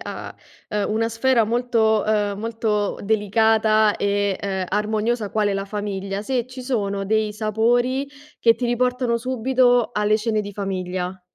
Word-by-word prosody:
a, -, -, -7 dB, 0.4 s
ehm, 210 Hz, -1 st, -1 dB
una 225 Hz, +1 st, 0 dB
sfera 230 Hz, +1 st, +2 dB
molto, 225 Hz, -2 st, +1 dB
uhm, 205 Hz, -2 st, 0 dB
molto 220 Hz, -2 st, -1 dB
delicata, 215 Hz, 0 st, +3 dB
e, 200 Hz, -1 st, 0 dB
uhm, 190 Hz, -2 st, -2 dB
armoniosa 215 Hz, +1 st, -1 dB
quale 210 Hz, -2 st, +1 dB
la 195 Hz, 0 st, -2 dB
famiglia, 200 Hz, -1 st, -4 dB
se 245 Hz, +1 st, -1 dB
ci 255 Hz, 0 st, -9 dB
sono 200 Hz, -6 st, -2 dB
dei 215 Hz, +1 st, 0 dB
sapori 240 Hz, +5 st, +1 dB, 0.3 s
che 230 Hz, -1 st, +5 dB
ti 245 Hz, -, -3 dB
riportano 245 Hz, 0 st, +1 dB
subito 245 Hz, 0 st, +2 dB
alle 210 Hz, 0 st, +2 dB
cene 215 Hz, 0 st, -1 dB
di 205 Hz, 0 st, -6 dB
famiglia. 185 Hz, -2 st, -4 dB
215 Hz, 145 wpm, -22 LUFS, 205-235 Hz, 0.4 s, che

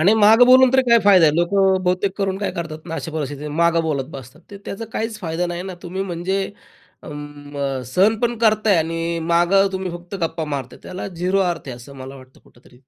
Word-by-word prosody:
आणि 195 Hz, +7 st, +5 dB
मागं 220 Hz, +3 st, +6 dB
बोलून 255 Hz, 0 st, +6 dB
तरी 265 Hz, 0 st, +4 dB
काय 235 Hz, -2 st, +5 dB
फायदा 185 Hz, -5 st, +6 dB
आहे. 150 Hz, -, +2 dB
लोकं 190 Hz, +1 st, +2 dB
बहुतेक 185 Hz, +2 st, 0 dB
करून 195 Hz, -1 st, -1 dB
काय 205 Hz, -, -2 dB
करतात 160 Hz, -2 st, -5 dB
ना 165 Hz, -, -5 dB
अशा 155 Hz, +1 st, -5 dB
परिस्थितीत, 145 Hz, -1 st, -4 dB
मागं 170 Hz, +2 st, +2 dB
बोलत 145 Hz, -4 st, -1 dB
बसतात 135 Hz, +3 st, -11 dB
ते. 200 Hz, -, -9 dB
त्याचा 225 Hz, +3 st, -6 dB
काहीच 220 Hz, -1 st, -3 dB
फायदा 170 Hz, 0 st, -2 dB
नाही 175 Hz, 0 st, -4 dB
ना, 190 Hz, -1 st, -7 dB
तुम्ही 185 Hz, +2 st, -4 dB
म्हणजे 190 Hz, +2 st, -2 dB, 0.5 s
अं, 145 Hz, -2 st, -6 dB
सहन 195 Hz, -, +2 dB
पण 240 Hz, -1 st, 0 dB
करताय 215 Hz, -3 st, +3 dB
आणि 165 Hz, +1 st, -1 dB
मागं 175 Hz, +4 st, +3 dB
तुम्ही 190 Hz, -1 st, -3 dB
फक्त 175 Hz, +2 st, -9 dB
गप्पा 165 Hz, -1 st, -2 dB
मारताय, 140 Hz, -3 st, -5 dB
त्याला 185 Hz, +1 st, -6 dB
झिरो 180 Hz, +2 st, -1 dB
अर्थ 175 Hz, -6 st, -2 dB
आहे 125 Hz, -, -5 dB
असं 140 Hz, +3 st, -13 dB
मला 135 Hz, +1 st, -9 dB
वाटतं 130 Hz, 0 st, -17 dB
कुठेतरी. 125 Hz, 0 st, -21 dB
175 Hz, 205 wpm, -20 LUFS, 150-195 Hz, 0.5 s, मागं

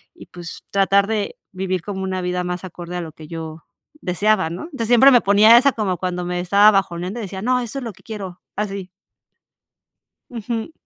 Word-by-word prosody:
y -, -, -13 dB
pues, 175 Hz, -2 st, -10 dB
tratar 200 Hz, 0 st, +3 dB
de 215 Hz, -2 st, -2 dB
vivir 185 Hz, -2 st, -3 dB
como 195 Hz, -2 st, -5 dB
una 185 Hz, -1 st, -2 dB
vida 180 Hz, 0 st, -2 dB
más 180 Hz, +1 st, -4 dB
acorde 175 Hz, -1 st, -8 dB
a 180 Hz, -, -2 dB
lo 165 Hz, -2 st, -7 dB
que 155 Hz, 0 st, -13 dB
yo 160 Hz, 0 st, -8 dB, 0.4 s
deseaba, 190 Hz, 0 st, +1 dB
¿no? 170 Hz, +2 st, -6 dB
Entonces, 275 Hz, -9 st, -5 dB
siempre 245 Hz, +4 st, +7 dB
me 245 Hz, -, +7 dB
ponía 210 Hz, +4 st, +7 dB
esa 275 Hz, +3 st, +5 dB
como 195 Hz, -5 st, -1 dB
cuando 180 Hz, 0 st, -3 dB
me 180 Hz, 0 st, -2 dB
estaba 200 Hz, +4 st, +5 dB
bajoneando 190 Hz, +1 st, -1 dB
y -, -, -4 dB
decía: 190 Hz, -1 st, -6 dB
"No, 250 Hz, +3 st, +1 dB
eso 245 Hz, +2 st, -4 dB
es -, -, -7 dB
lo 230 Hz, -, -5 dB
que -, -, -22 dB
quiero", 195 Hz, -5 st, -7 dB
así. 195 Hz, -2 st, -4 dB, 1.4 s
Ujú. 230 Hz, +3 st, -4 dB
195 Hz, 200 wpm, -21 LUFS, 180-220 Hz, 1.4 s, siempre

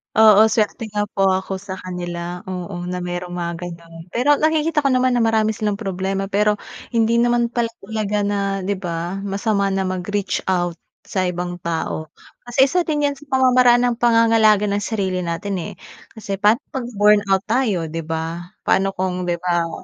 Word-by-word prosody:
Oo, 220 Hz, 0 st, +7 dB
swerte 220 Hz, +1 st, 0 dB
nga 205 Hz, -1 st, -1 dB
po 195 Hz, 0 st, +2 dB
ako 190 Hz, 0 st, -1 dB
sa 190 Hz, -1 st, -7 dB
kanila. 175 Hz, -1 st, -5 dB
Oo, 180 Hz, -1 st, -5 dB
na 180 Hz, 0 st, -3 dB
mayro'ng 175 Hz, 0 st, -4 dB
mga 170 Hz, -1 st, -3 dB
ganyang 170 Hz, -1 st, -9 dB, 0.2 s
pero 285 Hz, +4 st, +3 dB
nakikita 315 Hz, 0 st, +2 dB
ko 285 Hz, -, +1 dB
naman 255 Hz, -1 st, +3 dB
na 245 Hz, -, +2 dB
marami 220 Hz, -1 st, +2 dB
silang 210 Hz, -1 st, -1 dB
problema. 195 Hz, -1 st, -3 dB
Pero 210 Hz, +1 st, +3 dB, 0.4 s
hindi 230 Hz, +1 st, +3 dB
naman 240 Hz, 0 st, +2 dB
pala 235 Hz, -1 st, 0 dB, 0.2 s
talaga 210 Hz, 0 st, -1 dB
na 200 Hz, -1 st, -1 dB
'di 200 Hz, 0 st, -2 dB
ba, 175 Hz, +1 st, -4 dB
masama 200 Hz, 0 st, 0 dB
na 195 Hz, 0 st, 0 dB
mag-reach 185 Hz, +1 st, -2 dB
out 175 Hz, -2 st, 0 dB, 0.3 s
sa 190 Hz, -, -2 dB
ibang 180 Hz, -1 st, -3 dB
tao. 160 Hz, -2 st, -3 dB, 0.3 s
Kasi 245 Hz, +2 st, +3 dB
isa 355 Hz, +6 st, +1 dB
din 300 Hz, -3 st, 0 dB
'yan 285 Hz, -, +1 dB
sa 285 Hz, +1 st, -16 dB
pamamaraan 250 Hz, -2 st, +5 dB
ng 240 Hz, -1 st, 0 dB
pangangalaga 225 Hz, -3 st, +4 dB
ng 200 Hz, 0 st, -1 dB
sarili 190 Hz, -4 st, -1 dB
natin, 180 Hz, +3 st, -3 dB
eh. -, -, -6 dB, 0.4 s
Kasi 210 Hz, -3 st, -5 dB
paano 210 Hz, +2 st, +5 dB, 0.2 s
'pag 255 Hz, -3 st, -3 dB
burnout 205 Hz, -2 st, +4 dB
tayo, 215 Hz, -7 st, +1 dB
'di 165 Hz, +1 st, -4 dB
ba? 165 Hz, +1 st, -4 dB, 0.2 s
Paano 195 Hz, 0 st, +3 dB
kung 185 Hz, 0 st, -1 dB
'di 175 Hz, -1 st, -1 dB
ba, 170 Hz, -1 st, 0 dB
200 Hz, 175 wpm, -20 LUFS, 180-225 Hz, 0.4 s, Oo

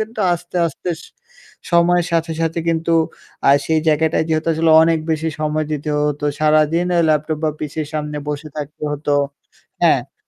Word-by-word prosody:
কিন্তু 220 Hz, +1 st, -5 dB
আস্তে, 175 Hz, +1 st, -5 dB
আস্তে 165 Hz, +3 st, -6 dB
স -, -, -12 dB, 0.7 s
সময়ের 175 Hz, 0 st, +4 dB
সাথে, 165 Hz, 0 st, 0 dB
সাথে 165 Hz, +1 st, -1 dB
কিন্তু 165 Hz, 0 st, 0 dB, 0.6 s
আ -, -, +8 dB, 0.2 s
সেই 160 Hz, -1 st, +2 dB
জায়গাটায় 160 Hz, +1 st, +2 dB
যেহেতু 155 Hz, +1 st, 0 dB
আসলে 160 Hz, 0 st, +2 dB
অনেক 165 Hz, 0 st, +3 dB
বেশি 160 Hz, +1 st, 0 dB
সময় 155 Hz, 0 st, 0 dB
দিতে 150 Hz, 0 st, -3 dB
হতো। 150 Hz, 0 st, -1 dB, 0.2 s
সারাদিন 155 Hz, +3 st, +3 dB
আ -, -, +3 dB
ল্যাপটপ 155 Hz, 0 st, +1 dB
বা 155 Hz, -, +2 dB
পিসির 150 Hz, 0 st, -4 dB
সামনে 150 Hz, -1 st, -3 dB
বসে 150 Hz, +1 st, -4 dB
থাকতে 150 Hz, 0 st, -7 dB
হতো 145 Hz, 0 st, -4 dB, 0.7 s
হ্যাঁ। -, -, +2 dB
155 Hz, 165 wpm, -19 LUFS, 150-165 Hz, 0.7 s, আ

